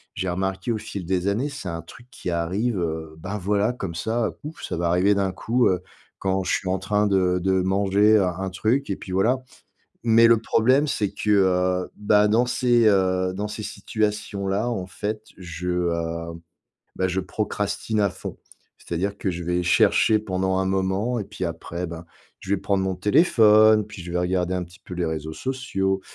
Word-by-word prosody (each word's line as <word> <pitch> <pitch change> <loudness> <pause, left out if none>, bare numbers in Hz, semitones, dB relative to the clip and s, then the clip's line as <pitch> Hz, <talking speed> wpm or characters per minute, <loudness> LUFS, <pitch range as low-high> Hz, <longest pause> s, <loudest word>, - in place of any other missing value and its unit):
j'ai 95 - -2
remarqué 95 +4 -2
au - - -1
fil 100 -4 -6
des 95 +1 0
années, 115 +8 0
c'est 140 -10 -6
un 85 0 -4
truc 115 +9 -15
qui 90 - -6
arrive, 95 +7 -1
heu, 80 -2 -3
ben 100 +5 -4
voilà 100 +4 +1
comme 95 -8 -5
ça, 110 +5 -1
pouf 155 +2 -8
ça - - -3
va 85 0 0
arriver 95 +4 +3
d'un 95 -1 0
coup, 120 +6 +1
heu, 90 -1 0 0.4
quand 95 0 0
je - - -2
suis 95 - -1
en 95 -1 0
train 105 +2 +1
de 90 -2 +2
de 95 +1 +1
manger 100 +3 +3
un 95 -3 +2
un 95 - -2
truc 115 +9 0
et 100 - 0
puis 90 - -8
voilà, 115 +8 +3 0.7
mais 115 0 +6
le 115 -1 +6
problème 130 +6 +3
c'est 105 -8 -1
que, 105 - -5
heu, 90 -2 +2
bah, 105 0 +3
dans 115 +4 +3
ces, 120 -2 +3
heu 95 -2 +2
dans 105 +2 -3
ces 105 - -6
situations-là 105 0 -2
en 95 -6 -3
fait 105 +3 -4 0.2
je, 90 0 -6 0.2
hem 85 0 -4 0.6
bah, 95 - +1
je 95 +1 0
procrastine 105 +3 -2
à 100 -2 +2
fond. - - -8 0.5
C'est-à-dire 100 +4 -2
que 95 - -1
je 85 -1 -5
vais 90 +1 0
chercher 110 +4 +4
pendant 95 -2 -1
un 95 - +1
moment 95 +5 0
et - - -4
puis 100 -2 -6
après, 85 +1 -4
ben, 85 0 -8 0.4
je 95 - -9
vais 100 - +3
prendre 95 0 0
mon 95 -1 -1
téléphone, 110 - +5
puis 100 -4 -10
je 85 - -8
vais 90 - -1
regarder 90 0 0
un 90 - -2
petit 90 +3 -17
peu 90 - -7
les 90 -1 -1
réseaux 80 -1 -4
sociaux, 95 -5 -2
95 Hz, 195 wpm, -24 LUFS, 90-105 Hz, 0.7 s, mais